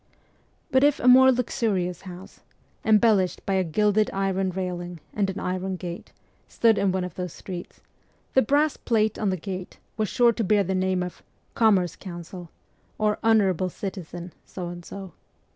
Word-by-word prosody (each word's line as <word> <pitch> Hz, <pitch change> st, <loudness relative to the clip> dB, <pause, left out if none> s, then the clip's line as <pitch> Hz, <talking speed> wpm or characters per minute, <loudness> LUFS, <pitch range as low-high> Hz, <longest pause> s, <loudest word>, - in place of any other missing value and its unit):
But 260 Hz, 0 st, +4 dB
if 290 Hz, 0 st, +4 dB
a 250 Hz, -, 0 dB
more 260 Hz, +1 st, +8 dB
luxurious 210 Hz, -8 st, -1 dB
house, 185 Hz, 0 st, -11 dB, 0.4 s
embellished 215 Hz, -4 st, +3 dB
by 195 Hz, -, 0 dB
a 190 Hz, -1 st, +2 dB
gilded 210 Hz, +5 st, +2 dB
iron 195 Hz, -1 st, 0 dB
railing 180 Hz, -2 st, -4 dB
and 200 Hz, -2 st, 0 dB
an 195 Hz, -, -4 dB
iron 185 Hz, +1 st, -2 dB
gate, 175 Hz, -1 st, -7 dB, 0.4 s
stood 225 Hz, -2 st, +3 dB
in 195 Hz, -, +2 dB
one 185 Hz, 0 st, -1 dB
of 180 Hz, -2 st, -5 dB
those 180 Hz, -2 st, -5 dB
streets, 180 Hz, -2 st, -8 dB, 0.5 s
the 265 Hz, -, +5 dB
brass 290 Hz, +5 st, +2 dB
plate 220 Hz, -2 st, 0 dB
on 210 Hz, -, +1 dB
the 185 Hz, -, -1 dB
gate 185 Hz, +1 st, -6 dB, 0.2 s
was 215 Hz, -3 st, 0 dB
sure 240 Hz, -1 st, +4 dB
to 230 Hz, -, -2 dB
bear 205 Hz, 0 st, +3 dB
the 190 Hz, +1 st, -2 dB
name 185 Hz, -1 st, 0 dB
of 180 Hz, -, -7 dB, 0.2 s
' -, -, -41 dB
Commerce 185 Hz, -7 st, +4 dB
Counsel 175 Hz, -1 st, -9 dB, 0.2 s
' -, -, -39 dB
or 210 Hz, -1 st, +1 dB
' -, -, -31 dB
Honourable 195 Hz, -5 st, +3 dB
Citizen 175 Hz, -2 st, -7 dB
' -, -, -40 dB
So 180 Hz, -2 st, -4 dB
and 175 Hz, 0 st, -8 dB
So. 190 Hz, -1 st, -9 dB
190 Hz, 180 wpm, -25 LUFS, 180-215 Hz, 0.5 s, more